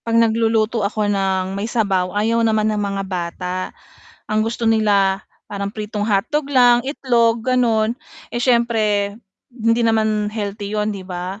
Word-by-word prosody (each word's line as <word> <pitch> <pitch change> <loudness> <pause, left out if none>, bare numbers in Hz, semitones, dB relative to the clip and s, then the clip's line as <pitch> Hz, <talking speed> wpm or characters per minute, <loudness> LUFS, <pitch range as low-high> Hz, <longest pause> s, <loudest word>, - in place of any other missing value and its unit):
'Pag 230 0 -1
nagluluto 225 0 +2
ako 205 0 0
ng 190 -1 0
may 200 +3 -3
sabaw, 195 -5 0
ayaw 225 +3 +1
naman 220 -1 +2
ng 210 - -1
mga 200 -1 -2
bata. 180 -1 -4 0.7
Ang 215 0 +1
gusto 230 +1 -3
nila, 205 -3 +3 0.3
parang 200 -1 -3
pritong 210 -1 -4
hotdog 240 +9 0
lang, 245 -3 +5
itlog, 235 -5 +1
gano'n. 235 -4 +2 0.4
Eh, 240 - -2
siyempre, 225 -5 +2 0.4
hindi 230 0 +1
naman 215 -2 +1
healthy 205 -1 -4
'yon, 210 0 0
'di 195 -2 -7
ba? 185 +2 -6
215 Hz, 145 wpm, -20 LUFS, 200-230 Hz, 0.7 s, lang